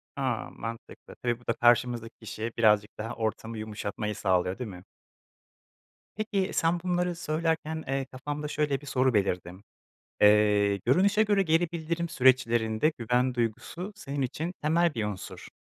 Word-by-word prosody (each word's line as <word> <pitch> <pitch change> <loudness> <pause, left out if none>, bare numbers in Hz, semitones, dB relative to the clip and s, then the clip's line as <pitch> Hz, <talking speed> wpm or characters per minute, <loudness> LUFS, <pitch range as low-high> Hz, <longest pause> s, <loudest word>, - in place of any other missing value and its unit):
A! - - -2
Mantıklı, 115 +1 -8
tabii 120 -1 -2
bu 120 - -22
da - - +2
karşımızdaki 120 -1 +2
kişiye 110 +1 -5
birazcık 105 -2 +3
daha 115 +2 -4
ortamı 110 0 -3
yumuşatmayı 105 0 -4
sağlıyor, 90 +2 +1
değil 125 -4 -4
mi? 90 -2 -10 1.3
Peki, 200 -3 -1
sen 165 +1 +2
bunları 180 -1 0
söylerken, 160 -1 -1
eee, 135 0 -1
kafamda 145 +3 -5
şöyle 145 -2 -1
bir - - -12
soru 130 -1 +2
belirdi. 90 -4 0 0.7
Eee, 105 -1 +5
görünüşe 190 - +3
göre 205 -2 +3
geri 165 -1 +2
bildirim 170 +1 -2
süreçlerinde 125 -2 +3
güven 125 +2 +1
duygusu 125 - -3
senin 140 -8 -4
için 155 +7 -3
temel 165 +1 +2
bir 110 - -1
unsur. 105 -3 -6
125 Hz, 140 wpm, -28 LUFS, 110-160 Hz, 1.3 s, Eee